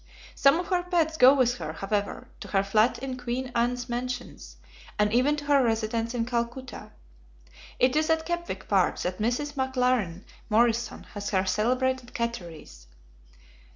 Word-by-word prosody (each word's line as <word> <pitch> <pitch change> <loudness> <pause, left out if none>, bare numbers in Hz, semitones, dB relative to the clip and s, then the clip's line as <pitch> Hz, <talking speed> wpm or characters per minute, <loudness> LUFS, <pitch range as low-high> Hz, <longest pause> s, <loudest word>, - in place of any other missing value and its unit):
Some 275 +4 +4
of 355 - -5
her 360 -2 +2
pets 340 -3 0
go 265 -1 +7
with 250 -2 +2
her, 155 - -5
however, 200 +3 -3
to - - -8
her 195 -1 +1
flat 215 +4 +2
in 260 -1 -5
Queen 250 +1 -3
Anne's 245 +1 0
Mansions, 245 - -5 0.4
and 210 0 +2
even 260 +5 +3
to 295 -1 -7
her 285 -2 +4
residence 225 +1 -1
in 230 -1 0
Calcutta. 240 +2 -4 0.9
It 255 +2 +3
is 310 +1 +1
at 320 0 +1
Kepwick 345 0 -4
Park 190 -3 +2
that 180 +1 -3
Mrs. 245 +7 -1
McLaren 250 - 0 0.3
Morrison 235 +1 +1
has 205 -1 -4
her 190 -1 +1
celebrated 250 +4 0
"catteries." 170 - -5
245 Hz, 155 wpm, -27 LUFS, 215-265 Hz, 0.9 s, go